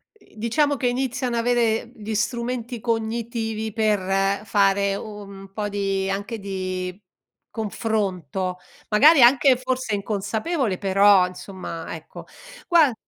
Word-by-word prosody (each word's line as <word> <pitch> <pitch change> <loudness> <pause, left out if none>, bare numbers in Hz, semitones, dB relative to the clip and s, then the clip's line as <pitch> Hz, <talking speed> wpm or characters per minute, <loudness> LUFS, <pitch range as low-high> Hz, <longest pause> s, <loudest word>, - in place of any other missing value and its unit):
Ehm, 415 - -24
diciamo 285 +7 +1
che 250 - 0
iniziano 250 -1 -1
avere 235 -1 +1
gli 215 0 -5
strumenti 235 +1 -2
cognitivi 225 -1 -2
per 195 -2 +1
fare 200 -1 +2
u - - -6 0.2
un 195 -1 -11
po' 210 -1 -3
di 195 -1 -1
anche 205 +4 -3
di 185 -1 -4 0.5
confronto, 190 - -2 0.3
magari 280 +7 +6
anche 260 +1 +6
forse 255 -4 -2
inconsapevole 215 - -2
però 195 -1 +5
insomma 180 -2 -7
ecco, - - -11 0.4
guar 320 -8 +5
215 Hz, 115 wpm, -23 LUFS, 195-240 Hz, 0.5 s, magari